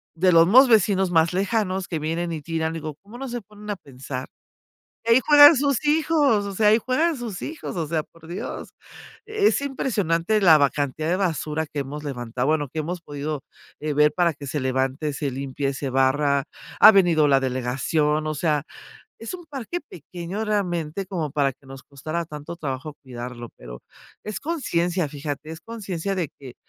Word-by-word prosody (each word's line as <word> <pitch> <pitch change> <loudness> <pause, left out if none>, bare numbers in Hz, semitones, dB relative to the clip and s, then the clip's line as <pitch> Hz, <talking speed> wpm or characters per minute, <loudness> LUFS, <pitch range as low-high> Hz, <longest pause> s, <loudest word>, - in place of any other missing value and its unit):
de 180 +2 +3
los 165 0 +6
mismos 260 +8 +7
vecinos 195 -4 +3
más 165 0 +3
lejanos 190 -1 0
que 160 - -3
vienen 165 +3 -2
y 160 - -4
tiran, 160 +1 -2
digo: 155 -2 -5
"¿Cómo 215 +4 -12
no 270 - -5
se 240 0 -4
ponen 210 +1 -13
a 205 - -1
pensar?, 130 -3 -7 0.8
ahí 230 +2 +7
juegan 290 0 +9
sus 280 -1 +1
hijos", 295 -8 +3
o 200 - -5
sea, 210 +2 +2
ahí 215 - +6
juegan 305 +8 +1
sus 230 -7 -6
hijos, 310 -8 -6
o 165 -3 -1
sea, 160 0 0
por 165 -1 -18
Dios. 175 +3 -6 0.6
Es 430 -5 +2
impresionante 215 - 0
la 160 -4 +8
ba 140 -1 +4
cantidad 145 +2 -2
de 180 - +2
basura 160 -4 -1
que 150 - -8
hemos 145 +2 -6
levantado, 125 -1 -3
bueno, 150 -3 +1
que 155 +4 -4
hemos 175 +3 -4
podido 145 -1 -4 0.4
ver 150 0 +2
para 175 -3 +2
que 140 0 -9
se 145 +2 -2
levante, 130 +3 -1
se 140 0 -2
limpie, 135 +1 -3
se 135 +1 -4
barra, 135 +2 +2 0.4
ha 215 - +11
venido 170 -6 +4
la 135 -1 +4
delegación, 135 +4 0
o 155 - -1
sea, 150 -1 0 0.5
es 225 - -6
un 350 -1 -8
parque 295 +4 -5
pequeño 180 - -7
realmente, 185 -4 -2
como 165 -6 -3
para 140 -2 +1
que 135 - -25
nos 135 0 -10
costara 155 +5 -4
tanto 155 +2 -8
trabajo 145 -1 -5
cuidarlo, 120 -2 -7
pero - - -10 0.4
es 215 -1 -5
conciencia, 180 - -1
fíjate, 145 +1 -6
es 160 0 -8
conciencia 195 -4 -4
de 170 -6 -2
que: 130 -3 -11
165 Hz, 180 wpm, -24 LUFS, 145-205 Hz, 0.8 s, ha